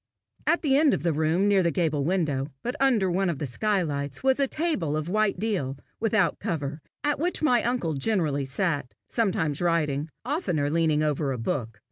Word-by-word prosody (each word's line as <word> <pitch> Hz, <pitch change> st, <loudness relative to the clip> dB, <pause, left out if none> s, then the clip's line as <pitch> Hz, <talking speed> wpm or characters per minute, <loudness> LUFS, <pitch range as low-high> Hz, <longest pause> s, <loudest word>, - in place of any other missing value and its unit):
At 340 Hz, -, +3 dB
the 275 Hz, -3 st, +3 dB
end 295 Hz, -2 st, +4 dB
of 145 Hz, -, -5 dB
the 170 Hz, -2 st, +2 dB
room, 160 Hz, +6 st, +2 dB
near 200 Hz, -2 st, +4 dB
the 170 Hz, -, +2 dB
gable 155 Hz, -3 st, 0 dB
window, 150 Hz, -5 st, 0 dB, 0.2 s
but 245 Hz, -, -2 dB
under 225 Hz, -9 st, +3 dB
one 190 Hz, +1 st, +1 dB
of 165 Hz, -, -2 dB
the 145 Hz, -, -3 dB
skylights, 145 Hz, -, -1 dB
was 265 Hz, +1 st, +3 dB
a 275 Hz, -, +3 dB
table 260 Hz, -, -1 dB
of 155 Hz, +2 st, -3 dB
white 215 Hz, +1 st, +1 dB
deal, 180 Hz, -12 st, -1 dB, 0.2 s
without 220 Hz, -2 st, +1 dB
cover, 155 Hz, -6 st, -3 dB, 0.2 s
at 290 Hz, -1 st, +1 dB
which 345 Hz, 0 st, -1 dB
my 245 Hz, -6 st, +4 dB
uncle 235 Hz, -10 st, 0 dB
generally 150 Hz, -3 st, 0 dB
sat, 145 Hz, -2 st, -1 dB
sometimes 190 Hz, -, 0 dB
writing, 155 Hz, -3 st, 0 dB, 0.2 s
oftener 180 Hz, -, 0 dB
leaning 155 Hz, -2 st, +2 dB
over 150 Hz, -2 st, 0 dB
a 130 Hz, -, -2 dB
book. 115 Hz, -2 st, -3 dB
170 Hz, 185 wpm, -26 LUFS, 145-220 Hz, 0.2 s, end